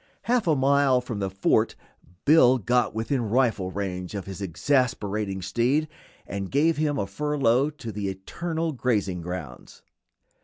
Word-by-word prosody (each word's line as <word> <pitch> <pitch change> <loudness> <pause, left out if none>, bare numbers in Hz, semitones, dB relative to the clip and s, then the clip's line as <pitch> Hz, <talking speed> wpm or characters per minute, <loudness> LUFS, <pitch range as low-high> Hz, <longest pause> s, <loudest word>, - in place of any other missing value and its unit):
Half 235 -1 +1
a 160 - +4
mile 140 -1 +3
from 120 -4 -5
the 95 -1 -1
fort 95 +1 +1 0.5
Bill 135 -4 +6
got 120 0 +1
within 115 +4 -1
rifle 115 -6 +1
range 95 -1 -4
of 100 - -4
his 95 +1 -7
exasperating 105 - -1
steed 130 - +1 0.4
and 100 -1 -5
gave 155 +4 +2
him 150 -1 0
a 100 - 0
furlough 140 -1 +1
to 145 -7 -8
the 100 -1 -3
eternal 160 - -3
grazing 105 - -1
grounds. 85 -8 -8
120 Hz, 145 wpm, -25 LUFS, 95-145 Hz, 0.5 s, Bill